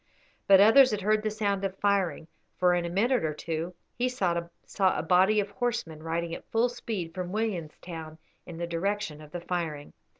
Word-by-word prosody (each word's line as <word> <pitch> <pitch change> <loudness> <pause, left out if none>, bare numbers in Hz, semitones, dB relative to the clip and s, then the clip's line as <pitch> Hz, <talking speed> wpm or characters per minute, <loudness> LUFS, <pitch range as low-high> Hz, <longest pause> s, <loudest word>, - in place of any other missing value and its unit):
But 195 -1 +8
others 255 +6 +8
had 210 -3 -2
heard 215 +2 +2
the 215 - -1
sound 205 -2 -1
of 195 -1 -3
firing, 190 -6 0 0.3
for 180 -1 +4
in 175 -1 0
a - - -3
minute 230 +7 +1
or 155 -1 -1
two 165 +3 -4 0.2
he 250 +1 0
saw 175 -8 -1 0.3
a 190 -1 +3
body 190 +4 +4
of 200 0 -2
horsemen 200 -8 -3
riding 165 +1 -2
at - - -8
full 230 +2 +2
speed 205 -8 -5
from 180 0 -4
Williamstown 170 -6 -4 0.3
in 170 -2 -8
the 170 - -2
direction 170 -2 -2
of 150 - -12
the 175 - -5
firing. 165 -5 -4
185 Hz, 190 wpm, -28 LUFS, 165-210 Hz, 0.3 s, But